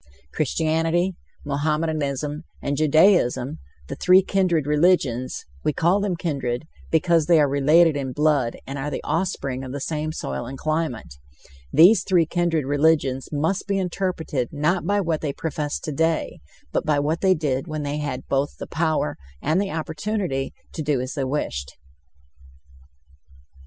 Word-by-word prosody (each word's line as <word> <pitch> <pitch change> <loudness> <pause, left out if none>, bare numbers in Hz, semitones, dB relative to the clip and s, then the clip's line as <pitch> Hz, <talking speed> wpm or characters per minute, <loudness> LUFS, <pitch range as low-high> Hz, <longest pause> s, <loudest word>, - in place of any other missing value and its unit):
Christianity, 165 +4 0 0.3
Mohammedanism 150 0 -1 0.2
and 140 - -2
Judaism, 155 -3 +3 0.3
the - - -5
three 185 +1 +5
kindred 180 -6 +1
religions 150 -5 +1 0.2
we 150 - +1
call 175 +7 +2
them 200 -3 -1
kindred 140 -8 -2 0.3
because 165 -1 +2
they 170 -2 +6
are 145 - +4
related 150 +4 +4
in 135 -2 -3
blood 145 -4 +1
and 135 +1 -5
are 140 +2 -2
the - - -5
offspring 140 -7 -2
of 130 - -6
the 140 - -3
same 155 +2 -2
soil 70 - -4
and 135 - -7
climate 155 - -2 0.6
these 175 +9 +7
three 180 -4 +3
kindred 165 -3 0
religions 145 -2 +1
must 160 +7 -1
be 200 -1 0
interpreted 175 -8 -2
not 155 +5 0
by 205 0 +2
what 165 -5 -1
they 145 -3 -2
profess 150 -1 -3
today, 160 +2 -1 0.3
but - - 0
by 150 -1 +1
what 150 +3 0
they 190 -1 +4
did 145 -1 -1
when 155 -2 -4
they 145 +1 -2
had 135 -3 -4
both 140 +1 -1
the - - -6
power 155 - -1 0.2
and 160 - +1
the 200 - -2
opportunity 160 -2 -2 0.2
to - - -4
do 145 -3 0
as 130 +1 -4
they 140 - -2
wished. 70 - -3
155 Hz, 150 wpm, -23 LUFS, 140-170 Hz, 0.6 s, these